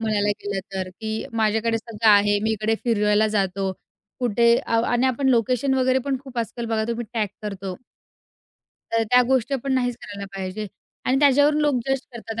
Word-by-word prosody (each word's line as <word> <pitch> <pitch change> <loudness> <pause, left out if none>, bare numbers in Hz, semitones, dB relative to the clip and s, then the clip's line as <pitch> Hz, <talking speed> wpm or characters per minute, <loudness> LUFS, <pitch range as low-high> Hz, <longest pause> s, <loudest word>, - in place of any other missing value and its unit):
म्हणायला 210 -2 0
गेलं 200 -1 -2
तर, 190 -1 -3
की 220 0 -3
माझ्याकडे 225 +1 +1
सगळं 225 -1 -1
आहे. 205 0 +5
मी 220 - +1
इकडे 220 +1 0
फिरायला 210 -2 +3
जातो, 195 -2 -1 0.5
कुठे 235 0 +4
आ 230 0 +2
आणि 245 +2 +2
आपण 265 +1 +1
लोकेशन 250 +2 +2
वगैरे 260 0 +2
पण 275 -1 0
खूप 260 -3 -7
आजकाल 235 +1 -3
बघा 220 -1 0
तुम्ही 235 0 -2
टॅग 215 -2 +1 0.2
करतो. 195 -2 -5 1.2
तर 230 0 +2
त्या 250 0 +6
गोष्टी 260 +1 +1
पण 275 - 0
नाहीच 245 -2 0
करायला 200 -1 -7
पाहिजे 190 +2 -4 0.4
आणि 260 +1 +2
त्याच्यावरून 290 +2 +4
लोकं 290 -4 +2
जज 270 - +1
करतात. 225 -1 -6
225 Hz, 175 wpm, -23 LUFS, 210-250 Hz, 1.2 s, त्या